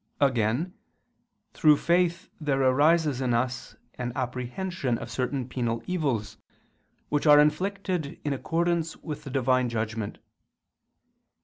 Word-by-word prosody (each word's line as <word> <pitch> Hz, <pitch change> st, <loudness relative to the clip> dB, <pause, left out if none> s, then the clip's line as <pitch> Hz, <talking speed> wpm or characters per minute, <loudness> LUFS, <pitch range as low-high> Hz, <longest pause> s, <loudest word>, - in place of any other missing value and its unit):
Again, 130 Hz, +5 st, +1 dB, 0.8 s
through 155 Hz, -3 st, +5 dB
faith 175 Hz, +1 st, +1 dB
there 145 Hz, -3 st, 0 dB
arises 145 Hz, +1 st, +3 dB
in 125 Hz, -2 st, +1 dB
us 125 Hz, +2 st, -2 dB, 0.2 s
an 125 Hz, 0 st, -2 dB
apprehension 125 Hz, +3 st, -2 dB
of 115 Hz, -, -8 dB
certain 125 Hz, +2 st, -2 dB
penal 120 Hz, -2 st, -2 dB
evils, 120 Hz, -, -2 dB, 0.7 s
which 145 Hz, +1 st, 0 dB
are 150 Hz, 0 st, +9 dB
inflicted 180 Hz, +1 st, 0 dB
in 145 Hz, -, +1 dB
accordance 165 Hz, +3 st, -1 dB
with 150 Hz, -1 st, -7 dB
the -, -, -6 dB
Divine 130 Hz, -1 st, +2 dB
judgment. 110 Hz, -2 st, -3 dB
140 Hz, 115 wpm, -27 LUFS, 125-165 Hz, 0.8 s, are